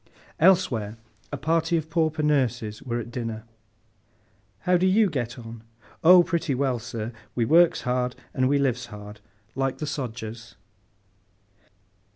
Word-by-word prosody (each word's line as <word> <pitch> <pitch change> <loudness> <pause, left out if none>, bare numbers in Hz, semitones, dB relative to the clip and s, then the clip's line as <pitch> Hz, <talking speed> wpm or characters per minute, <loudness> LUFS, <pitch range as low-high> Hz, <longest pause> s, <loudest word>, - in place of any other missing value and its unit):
Elsewhere, 115 - +3 0.3
a 145 - -3
party 165 +4 +1
of 160 -1 -3
pauper 160 -1 0
nurses 125 -7 0
were 120 -2 -3
at 120 0 -7
dinner. 115 -3 -4 1.2
'How 180 +6 +2
do 180 +1 +3
you 200 0 +4
get 120 -4 -3
on?' 115 -1 -9 0.4
'Oh 180 +2 +8
pretty 170 -5 -1
well, 130 -2 0
sir! 115 -1 -5 0.2
We 120 - +1
works 165 +6 +5
hard, 125 0 -1 0.2
and 130 -1 +1
we 145 - +3
lives 125 -3 0
hard—like 105 +4 -6
the 155 - -4
sodgers! 115 -6 -6
130 Hz, 135 wpm, -25 LUFS, 115-160 Hz, 1.2 s, Oh